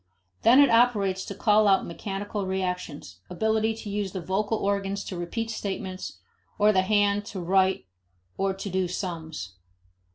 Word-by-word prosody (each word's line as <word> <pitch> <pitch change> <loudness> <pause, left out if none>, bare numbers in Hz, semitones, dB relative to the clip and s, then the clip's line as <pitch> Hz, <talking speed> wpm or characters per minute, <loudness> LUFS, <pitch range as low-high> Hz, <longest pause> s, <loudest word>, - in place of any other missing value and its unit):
Then 245 +4 +6
it 285 -3 +6
operates 210 -5 +3
to 200 - -6
call 210 +1 +4
out 195 -1 +4
mechanical 195 +3 -4
reactions, 180 - -4
ability 220 +4 +1
to 220 -1 -8
use 200 -2 -2
the 190 - -3
vocal 200 +5 -1
organs 200 0 -1
to 185 - -6
repeat 220 +7 -3
statements, 190 -3 -5 0.4
or 210 0 +5
the 190 - +4
hand 205 +1 +2
to 200 - -6
write 190 - +2 0.5
or 195 0 0
to 195 +1 -5
do 185 0 0
"sums." 160 - -5
195 Hz, 155 wpm, -26 LUFS, 185-210 Hz, 0.5 s, Then